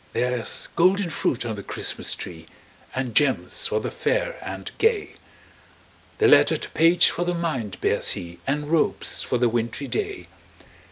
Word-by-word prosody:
There's 125 -2 +1
golden 185 +1 +3
fruit 130 -4 -1
on 115 - -2
the 100 - -6
Christmas - - -3
tree, 80 -2 -8 0.5
And 130 -3 -2
gems 145 +1 +2
for - - 0
the - - -4
fair - - -1
and - - -6
gay; 445 -2 +2 1.1
The 435 - +4
lettered 435 - +5
page 165 +2 +5
for 175 - -2
the 175 0 -1
mind 130 - -3
bears - - +2
he, 85 0 -8
And 145 +2 -2
robes 165 - +1
for - - -1
the 120 0 +3
wintry 120 +4 -2
day. 410 - -3
145 Hz, 155 wpm, -24 LUFS, 120-175 Hz, 1.1 s, lettered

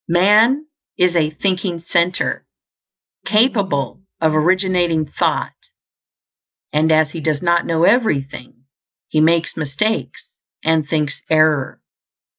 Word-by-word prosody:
Man 215 - +3 0.3
is 180 -1 +2
a 155 -3 +2
thinking 185 +1 -2
center, 175 +1 0 0.8
capable 200 - 0 0.2
of 160 -1 +1
originating 175 0 +1
thought; 145 - -2 1.2
and 155 +2 +2
as 155 -1 +3
he 165 - -7
does 155 0 -2
not 170 0 +1
know 165 0 0
everything, 140 - 0 0.5
he 155 - +1
makes 165 +1 +1
mistakes 160 +9 -3 0.3
and 160 -2 0
thinks 150 -2 -2
error. 155 -3 +1
165 Hz, 105 wpm, -18 LUFS, 155-185 Hz, 1.2 s, Man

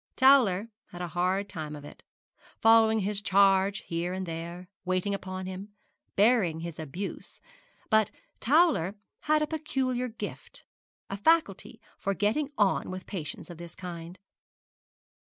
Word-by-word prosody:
Towler 235 -7 +5 0.2
had 175 - -10
a 175 - -4
hard 185 +3 0
time 155 -4 -6
of 145 -1 -10
it, - - -12 0.6
following 225 -1 +5
his 200 +1 -1
charge 195 0 +4
here 170 +2 -3
and 190 0 -3
there, 170 +2 -6 0.2
waiting 185 +2 0
upon 185 -1 -5
him, 190 +2 -7 0.4
bearing 200 -7 +3
his 170 -1 -6
abuse; 160 +6 -6 0.5
but 220 -2 +4 0.3
Towler 270 - +3 0.2
had 305 0 +2
a - - +2
peculiar 265 -5 -1
gift, 230 -1 -8 0.5
a 195 - -3
faculty 325 +10 +1 0.2
for 195 0 -1
getting 270 +10 +1
on 205 -3 +2
with 185 0 -6
patients 175 -2 -6
of 170 - -11
this 170 0 -9
kind. 175 -1 -8
195 Hz, 135 wpm, -29 LUFS, 175-225 Hz, 0.6 s, Towler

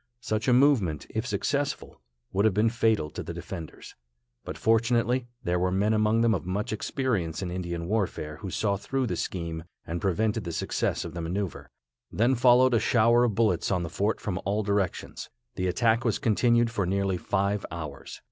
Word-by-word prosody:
Such 110 -1 -2
a - - +5
movement, 120 - +3
if 110 +3 -2
successful, 140 +7 -2 0.3
would 100 +1 +2
have 105 -4 +3
been 110 +2 +3
fatal 110 -10 +1
to - - -6
the - - -6
defenders; 80 -2 -8 0.5
but - - -6
fortunately 120 +2 +2 0.2
there 90 0 0
were 90 +1 +1
men 100 +4 +1
among 110 +1 +2
them 115 -1 +4
of 90 - -2
much 105 +6 -2
experience 105 - -2
in 90 - -4
Indian 85 -2 -4
warfare, 90 -6 -2
who 100 - -6
saw 100 +2 0
through 135 +6 -2
the - - -2
scheme, 85 -3 -4 0.2
and 85 +1 -4
prevented 105 +3 0
the 85 -2 -5
success - - -1
of 85 - -7
the 85 - -4
maneuver. 90 +2 -4 0.4
Then 120 +5 +2
followed 125 +1 +5
a 115 - +4
shower 120 +2 +4
of 110 -4 -1
bullets 105 -6 +1
on 90 -3 0
the 85 - -4
fort 100 +4 0
from 95 -3 -3
all 105 +3 0
directions. 100 -2 -2 0.2
The 90 - -2
attack 115 +5 +2
was 115 - +1
continued 120 -1 +2
for 100 -6 -1
nearly 95 0 0
five 100 +4 -1
hours. 75 -5 -7
105 Hz, 185 wpm, -27 LUFS, 90-115 Hz, 0.5 s, a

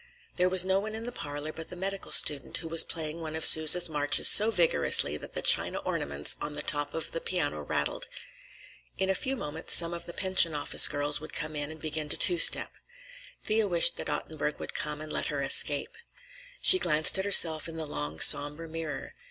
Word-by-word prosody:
There 180 0 -1
was 185 0 +5
no 190 +1 -1
one 215 +2 -8
in 225 - -8
the 245 - -7
parlor 145 -5 -9
but 160 0 -12
the - - -10
medical 195 +2 -6
student, 145 -2 +2
who 165 - -10
was 165 0 +5
playing 160 0 -6
one 160 -1 -8
of 160 - +2
Sousa's 160 +3 +7
marches 145 -2 +1
so 215 +2 +6
vigorously 175 -7 +1
that - - -14
the - - -5
china - - +2
ornaments 70 +1 -6
on 150 - -6
the 150 0 -2
top 145 -2 -2
of 160 - -2
the 165 - -7
piano 145 - -3
rattled. - - -5 0.9
In 190 0 -2
a - - -1
few 260 +8 -5
moments 160 - -2
some 170 0 +4
of 170 0 -9
the 170 - -9
pension 185 -4 +1
office 145 - +1
girls 145 +1 +1
would 155 - -11
come 155 0 -6
in 145 0 -4
and 160 0 -12
begin 155 -1 -5
to - - -1
two 175 -3 +3
step. - - +4 0.7
Thea 215 0 -1
wished 170 -1 +3
that - - -6
Ottenburg 150 -1 -5
would - - -9
come 150 0 -6
and 155 0 -9
let - - -2
her 145 -2 -5
escape. 140 +1 +3 0.7
She 370 - +6
glanced 155 - +1
at 190 - -4
herself 165 -6 +2
in 165 - -11
the 160 - -7
long, 75 - -7
somber 150 - +1
mirror. 160 -3 -9
160 Hz, 210 wpm, -26 LUFS, 150-180 Hz, 0.9 s, Sousa's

